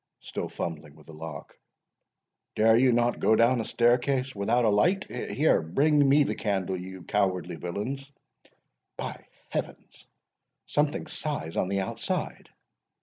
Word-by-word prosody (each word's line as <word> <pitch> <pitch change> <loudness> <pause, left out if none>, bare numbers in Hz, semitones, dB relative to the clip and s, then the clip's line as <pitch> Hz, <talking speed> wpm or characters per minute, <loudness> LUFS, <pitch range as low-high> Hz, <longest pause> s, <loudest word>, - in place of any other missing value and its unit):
—(still - - -5
fumbling 75 -3 -6
with 75 - -18
the 80 - -12
lock)—"dare 80 +7 -4
you 125 +2 +5
not 120 0 +1
go 110 - +4
down 115 +2 +4
a - - -5
stair 120 +3 +3
case 130 0 -1
without 115 +4 +1
a - - +4
light? 180 - +3
Here, 155 - +1
bring 140 - +3
me 145 +2 +6
the - - -1
candle, 95 -3 -1
you 95 0 -8
cowardly 95 -4 0
villains!—By 135 +10 -8 0.2
Heaven, - - -2 0.9
something 145 +1 0
sighs 145 - -4
on - - +1
the 100 +1 0
outside!" 95 - -3
110 Hz, 135 wpm, -27 LUFS, 95-135 Hz, 0.9 s, me